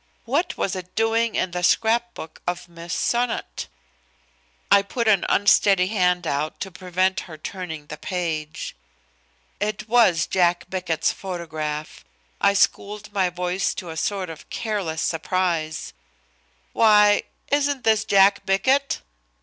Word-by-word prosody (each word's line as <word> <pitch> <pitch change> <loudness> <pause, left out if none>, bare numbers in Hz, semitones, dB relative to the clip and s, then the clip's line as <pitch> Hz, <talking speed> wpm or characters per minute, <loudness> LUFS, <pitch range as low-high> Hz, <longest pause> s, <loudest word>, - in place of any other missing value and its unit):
What 295 +9 0
was 195 - -1
it 185 -1 -8
doing 225 +1 +1
in 185 - 0
the 180 0 -3
scrap 230 +5 +2
book 160 - -9
of 175 0 -3
Miss 170 0 -10
Sonnot? 235 - -1 1.0
I 200 0 +7
put 230 +4 -3
an 200 -4 +4
unsteady 195 -2 +4
hand 180 -4 +1
out 145 +2 -2
to 190 - -4
prevent 185 +1 0
her 155 - -9
turning 160 -2 -6
the - - -8
page. 160 -4 -4 0.8
It 210 +1 -3
was 215 -9 +4
Jack 175 -2 +1
Bickett's 175 -4 0
photograph. 155 - -5 0.4
I 200 0 +4
schooled 205 +1 0
my 190 -3 +2
voice 180 +1 -1
to 180 -4 -6
a - - -7
sort 185 +1 -2
of 160 - -12
careless 195 -8 -2
surprise: 165 -2 -1 0.8
"Why! 210 -2 +5 0.3
Isn't 285 -2 +1
this 220 -1 +3
Jack 200 -1 +4
Bickett?" 260 +9 +1
185 Hz, 135 wpm, -23 LUFS, 170-210 Hz, 1.0 s, I